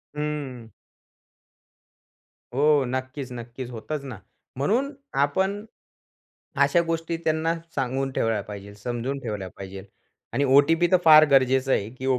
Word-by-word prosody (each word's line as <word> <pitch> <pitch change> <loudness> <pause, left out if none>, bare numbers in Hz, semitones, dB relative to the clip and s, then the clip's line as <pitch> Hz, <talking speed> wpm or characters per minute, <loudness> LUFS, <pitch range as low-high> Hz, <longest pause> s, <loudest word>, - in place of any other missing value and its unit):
हं. 145 -6 -4 1.8
हो, 145 +1 +4
नक्कीच, 130 +1 -4
नक्कीच 120 +1 -7
होतच 140 +5 -5
ना. 130 -5 -7 0.4
म्हणून 230 - +1 0.3
आपण 190 +8 0 1.0
अशा 175 - +3
गोष्टी 165 0 -2
त्यांना 160 +1 +1 0.2
सांगून 135 0 -1
ठेवल्या 115 -4 0
पाहिजे 100 0 -9
समजून 120 +5 -4
ठेवल्या 105 -6 -4
पाहिजेल 95 0 -8 0.5
आणि 140 - +1
ओ-टी-पी 145 +6 +4
तर - - +8
फार 155 -1 +9
गरजेचं 130 0 +3
आहे, 100 +2 0
की 130 +2 -7
ओ 130 -1 +2
135 Hz, 125 wpm, -25 LUFS, 120-155 Hz, 1.8 s, फार